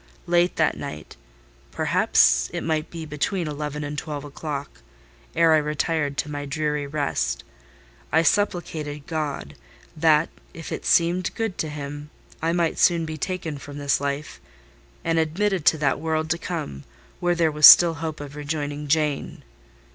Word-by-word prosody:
Late 175 +1 +2
that - - +2
night—perhaps - - 0
it - - -3
might 160 -1 -1
be 165 -2 -7
between 155 +4 -2
eleven 150 0 -4
and 145 0 -5
twelve 145 -2 -6
o'clock—ere 140 - -3
I - - +6
retired 150 -1 -1
to 150 +3 -2
my 145 -1 -5
dreary 150 0 -2
rest, 140 - -2 0.7
I 160 +4 +4
supplicated 155 -6 -1
God, 150 - -4 0.4
that, 155 0 +3 0.3
if 165 - -8
it - - -4
seemed 175 +2 +3
good 225 -5 -2
to 155 - -1
Him, 145 0 -7 0.3
I 165 +1 +1
might 170 -1 0
soon 170 -2 +4
be 155 -1 -6
taken 165 -5 -3
from 145 +1 -9
this 140 -1 0
life, 140 +1 -4 0.6
and 165 0 +1
admitted 180 +2 0
to 160 - +6
that 145 -3 +1
world 160 0 -1
to 170 - 0
come, 115 - -5 0.4
where 175 0 +1
there 165 -2 +2
was 150 0 +9
still 170 -1 +9
hope 160 0 -5
of 145 0 -8
rejoining 145 0 -4
Jane. 150 -1 -1
150 Hz, 150 wpm, -24 LUFS, 145-165 Hz, 0.7 s, was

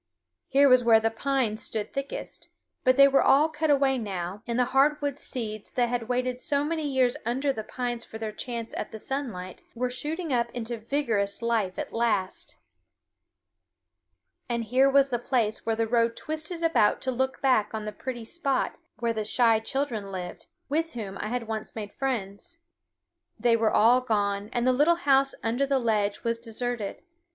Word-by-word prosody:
Here 280 +2 +5
was 255 -2 +6
where 230 -1 +6
the 225 0 0
pines 235 -2 -1
stood 215 -2 -3
thickest; 275 0 -5 0.3
but 255 0 +4
they 275 0 +9
were 275 0 +4
all 300 +4 +5
cut 315 0 -1
away 275 -2 +3
now, 195 -2 -4
and 235 0 -1
the 250 - +3
hardwood 285 0 +2
seeds 215 -5 -5
that 245 -1 0
had 240 -1 -2
waited 250 0 -1
so 285 0 +1
many 315 0 -2
years 255 -2 +2
under 265 +4 0
the 220 - -5
pines 240 0 -4
for 220 - -9
their 220 -1 -4
chance 230 +1 -6
at - - -4
the 220 - -6
sunlight 215 -8 -5
were 250 +1 -1
shooting 305 +4 -3
up 235 -1 +1
into 240 0 -3
vigorous 225 -4 -1
life 220 -5 0
at - - -5
last. 225 -5 -1 1.9
And 235 -1 -1
here 255 +5 +3
was 275 0 +4
the 240 -2 -1
place 230 -4 -1
where 225 - +2
the 225 0 +1
road 230 0 +2
twisted 315 +2 -3
about 310 -11 +3
to 260 - -1
look 260 +1 -1
back 255 -6 +3
on 220 -1 -4
the 210 - -3
pretty 240 +1 -6
spot 275 0 -1 0.2
where 230 0 0
the 215 -1 -2
shy 225 +1 +3
children 225 -4 -3
lived, 180 -2 -7 0.2
with 325 +3 -1
whom 205 -5 -6
I - - -3
had 235 0 -3
once 220 -1 -4
made 210 -2 -6
friends. 260 - -4 0.8
They 240 -1 +4
were 225 -1 +2
all 240 +5 +5
gone, 205 -3 -1
and 240 -1 0
the 255 - +4
little 295 +6 +4
house 275 -4 +3
under 240 +5 0
the 275 0 +2
ledge 215 -4 0
was 230 0 0
deserted. 230 -2 -4
240 Hz, 180 wpm, -27 LUFS, 220-270 Hz, 1.9 s, they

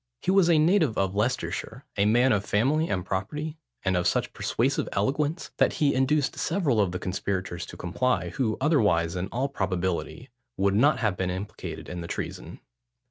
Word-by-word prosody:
He - - +2
was 190 -3 +4
a 165 - +5
native 155 - +3
of 95 -1 +1
Leicestershire: 125 +5 -2
a 100 0 +2
man 120 +4 +4
of 105 -3 +2
family 135 +11 +1
and 90 -2 -1
property, 150 - -3 0.3
and 95 -1 +2
of 90 -1 +1
such - - 0
persuasive - - 0
eloquence, 145 - -1
that - - +3
he 145 -3 +2
induced 135 +2 +1
several 155 - +1
of 95 -3 +1
the 90 - -3
conspirators 90 -2 -3
to - - -10
comply, 90 0 0
who 110 +4 -1
otherwise, 105 - +2
in 90 +1 -2
all 125 +6 -1
probability, 95 - -3 0.3
would 100 0 +2
not 140 +9 +3
have 105 -5 +1
been 90 0 -1
implicated 95 +3 -6
in 90 -1 -5
the 85 - -6
treason. - - -6
105 Hz, 180 wpm, -27 LUFS, 95-140 Hz, 0.3 s, a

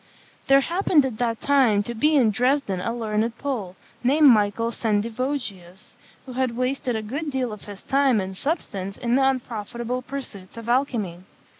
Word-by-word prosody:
There 275 0 +6
happened 335 -2 +2
at 240 -5 -4
that 230 -2 -1
time 255 -8 +3
to 235 - -5
be 300 +7 +2
in 240 -6 +4
Dresden 245 -4 +1
a 230 - -1
learned 225 0 -1
Pole, 225 -10 -4 0.3
named 285 +4 +6
Michael 225 0 +3
Sendivogius, 220 -4 -3 0.3
who 260 - -8
had 250 -2 -1
wasted 255 -1 -1
a 220 - -2
good 285 +8 -4
deal 260 -5 -2
of 210 - -11
his 200 -2 -10
time 270 -4 +3
and 190 0 -4
substance 200 - -3
in 240 -1 -1
the 270 - +4
unprofitable 240 -1 -2
pursuits 245 -8 -8
of 230 0 -8
alchymy. 235 -8 0
240 Hz, 165 wpm, -24 LUFS, 210-270 Hz, 0.3 s, There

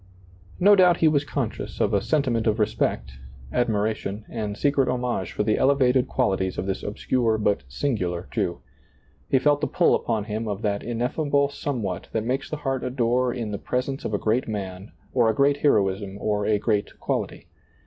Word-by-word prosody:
No 205 +3 +7
doubt 180 -3 +5
he 165 - +4
was 145 -2 +3
conscious 145 - -4
of - - +1
a - - +3
sen 150 -2 +1
timent 115 -4 0
of 110 0 +2
respect, 65 - -1 0.3
admiration, 110 -2 -1
and 105 -3 -4
secret 140 -2 +2
homage 125 -7 -2
for - - -1
the 105 0 +1
elevated 130 -2 +3
qualities 95 -7 0
of - - -2
this 95 -1 -2
obscure 110 +2 0
but 105 -1 +1
sin 120 - -1
gular 90 -3 -3
Jew, 85 - -2 0.7
He 135 - +4
felt 145 +2 +2
the 150 - +1
pull - - +3
upon 110 -3 0
him 110 +1 -4
of 105 0 -4
that 100 -1 0
in 120 0 -4
effable 140 +2 +1
somewhat 110 -12 -4
that 110 - 0
makes 130 +3 -2
the 155 - -3
heart 135 -3 -2
adore 125 0 +1
in 115 -4 -4
the 100 - -4
presence 130 +2 -2
of 105 - -2
a - - +2
great 110 +5 0
man 95 -2 -5 0.2
or 120 -3 +4
a 110 - +1
great 140 +2 +3
heroism 100 -7 +1
or 105 -1 -1
a 105 - +3
great 105 -1 -1
quality. - - -3
115 Hz, 190 wpm, -24 LUFS, 105-135 Hz, 0.7 s, No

